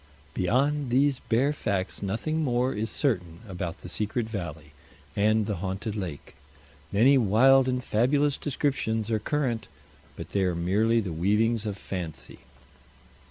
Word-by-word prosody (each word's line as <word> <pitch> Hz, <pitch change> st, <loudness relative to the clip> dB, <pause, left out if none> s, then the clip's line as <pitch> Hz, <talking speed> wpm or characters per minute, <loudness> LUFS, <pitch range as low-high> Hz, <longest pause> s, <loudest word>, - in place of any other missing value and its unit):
Beyond 135 Hz, +9 st, +1 dB
these 135 Hz, +2 st, +2 dB
bare 130 Hz, +6 st, +1 dB
facts 100 Hz, -9 st, -2 dB
nothing 135 Hz, +11 st, -1 dB
more 125 Hz, -1 st, +1 dB
is 110 Hz, +2 st, -2 dB
certain 90 Hz, -, -1 dB
about 90 Hz, -2 st, -5 dB
the -, -, -8 dB
secret 110 Hz, +2 st, -2 dB
valley 80 Hz, -8 st, -6 dB, 0.4 s
and 110 Hz, +1 st, +3 dB
the 105 Hz, -2 st, -2 dB
haunted 95 Hz, +4 st, -4 dB
lake. 90 Hz, -8 st, -6 dB, 0.6 s
Many 130 Hz, +7 st, +5 dB
wild 130 Hz, +5 st, +5 dB
and 125 Hz, -1 st, -1 dB
fabulous 140 Hz, +6 st, +2 dB
descriptions 125 Hz, -6 st, -1 dB
are 110 Hz, -, +2 dB
current, 125 Hz, -1 st, -1 dB, 0.5 s
but -, -, -8 dB
they 100 Hz, -, +1 dB
are 90 Hz, -2 st, +1 dB
merely 105 Hz, +7 st, +2 dB
the 95 Hz, -5 st, -4 dB
weavings 105 Hz, +6 st, +1 dB
of 100 Hz, -2 st, -3 dB
fancy. 90 Hz, -6 st, -6 dB
110 Hz, 140 wpm, -27 LUFS, 95-130 Hz, 0.6 s, Many